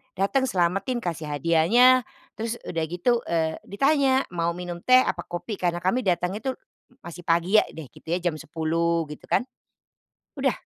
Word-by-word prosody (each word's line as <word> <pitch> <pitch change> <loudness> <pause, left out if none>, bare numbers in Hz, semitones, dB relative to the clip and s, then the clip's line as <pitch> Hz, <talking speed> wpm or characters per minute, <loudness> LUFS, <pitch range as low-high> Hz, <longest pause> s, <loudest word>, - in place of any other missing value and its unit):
datang 260 +8 +1
selametin 195 +5 0
kasih 165 -3 -4
hadiahnya, 215 - +4 0.3
terus 225 +1 -2
udah 165 -2 -3
gitu, 180 +9 +1
eee, 160 -1 -1
ditanya, 270 +4 +2
"Mau 170 -1 -1
minum 175 -1 -6
teh, 255 +7 +5
apa - - -3
kopi?" 190 +4 -5
Karena 175 0 -1
kami 190 +7 +2
datang 180 -5 0
itu 260 +2 -3
m 250 - -34
masih 170 +1 -8
pagi 170 +3 +1
ya - - -1
deh 150 -7 -10
gitu - - -19
ya, 175 +2 -1
jam 165 -3 -1
10 165 +2 -1
gitu 150 - -11
kan. - - +2 0.9
Udah, - - +1
175 Hz, 170 wpm, -25 LUFS, 170-240 Hz, 0.9 s, teh